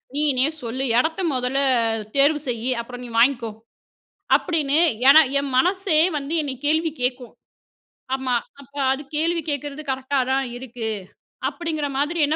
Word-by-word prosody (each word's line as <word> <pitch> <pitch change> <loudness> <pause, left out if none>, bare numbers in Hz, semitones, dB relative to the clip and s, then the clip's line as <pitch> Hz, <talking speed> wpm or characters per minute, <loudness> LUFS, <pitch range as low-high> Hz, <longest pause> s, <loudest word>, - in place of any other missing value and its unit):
நீனே 285 -3 +2
சொல்லு? 250 +2 -3 0.2
எடத்த 320 +6 -1
மொதல்ல 255 +1 0 0.2
அ 225 -1 -1
தேர்வு 285 +2 +4
செய்யி? 240 0 -2
அப்புறம் 245 +1 -9
நீ 245 - -8
வாங்கிக்கோ." 235 -1 +3 0.9
அப்டின்னு 305 -3 0 0.3
ஏன்னா, 310 +3 +9 0.2
என் 280 0 -2
மனசே 360 +3 +2 0.2
வந்து 285 +3 -5
என்னை 280 -3 -4
கேள்வி 320 +2 +1
கேட்கும். 250 -1 -3 0.8
ஆமா. 260 -2 -1 0.3
அப்ப 280 0 -18 0.2
அது 270 +2 -3
கேள்வி 335 +2 0
கேட்கிறது 285 +1 -4
கரெக்ட்டா 265 +1 -1
தான் 270 0 0
இருக்கு, 245 -2 -5 0.6
அப்டிங்கிற 315 -4 -3
மாதிரி 300 +5 -1
என்ன 305 - 0
275 Hz, 140 wpm, -22 LUFS, 250-305 Hz, 0.9 s, ஏன்னா